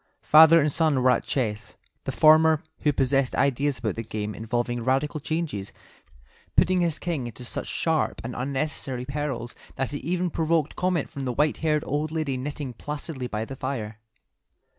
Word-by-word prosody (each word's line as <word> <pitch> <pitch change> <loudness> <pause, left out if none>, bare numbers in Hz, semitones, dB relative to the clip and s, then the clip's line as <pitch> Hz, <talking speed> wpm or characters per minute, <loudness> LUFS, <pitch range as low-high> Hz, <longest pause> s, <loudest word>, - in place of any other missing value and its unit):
Father 160 +2 +8
and 150 -1 +2
son 150 -4 +2
were 130 - +6
at - - +1
chess, 110 -6 -2 0.3
the - - -1
former, 155 0 +5 0.2
who 150 - +2
possessed 135 -1 +1
ideas 140 +1 +1
about 115 -3 -2
the 115 - -4
game 105 -1 -4
involving 120 +2 -2
radical 135 +5 0
changes, 150 - -3 0.8
putting 185 0 +4
his 165 -2 +1
king 160 -8 -3
into 120 +2 -9
such - - -5
sharp 160 -2 0
and 125 - -5
unnecessary 135 -1 -3
perils 140 -3 -3 0.2
that 135 +2 -2
it 145 - -3
even 175 +4 -1
provoked 160 -2 0
comment 180 -4 0
from 140 -4 -5
the 125 - -1
white 150 +4 +1
haired 150 -2 +1
old 150 +2 -1
lady 155 -4 -1
knitting 135 0 -5
placidly 145 0 -5
by 110 -1 -3
the 135 - -7
fire. 115 -5 -4
140 Hz, 170 wpm, -25 LUFS, 125-155 Hz, 0.8 s, Father